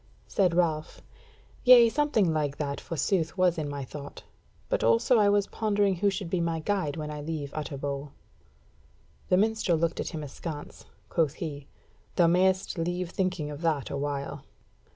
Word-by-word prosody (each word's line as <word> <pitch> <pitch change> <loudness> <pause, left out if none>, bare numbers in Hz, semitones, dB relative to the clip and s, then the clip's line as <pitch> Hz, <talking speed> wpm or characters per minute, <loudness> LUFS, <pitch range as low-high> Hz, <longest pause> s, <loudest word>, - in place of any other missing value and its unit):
Said 180 -4 +1
Ralph: 160 -3 0 0.6
"Yea, 245 -2 +9
something 230 - +2
like 150 -2 -1
that, 140 -2 -3
forsooth, 165 +2 -1
was 180 -2 +3
my 145 -3 -4
thought. 140 +2 -9 0.4
But - - 0
also 115 - +4
I 205 -1 +5
was 205 -1 +3
pondering 205 -3 0
who 200 +3 +3
should 195 -1 -4
be 175 +1 -1
my 165 -1 -1
guide 170 -4 -1
when 150 -1 -4
I 150 -1 -5
leave 150 -2 -4
Utterbol." 140 -1 -4 1.2
The 180 - +4
minstrel 215 -4 +2
looked 165 0 -1
at - - -2
him 160 -3 -5
askance; 150 +1 -7 0.2
quoth 160 -3 0
he: 145 -4 -6 0.5
"Thou 175 - +5
mayst 185 +1 +2
leave 175 +1 -2
thinking 185 -6 -1
of 145 +1 -8
that 160 -5 0
awhile." 140 0 -3
165 Hz, 155 wpm, -28 LUFS, 145-190 Hz, 1.2 s, Yea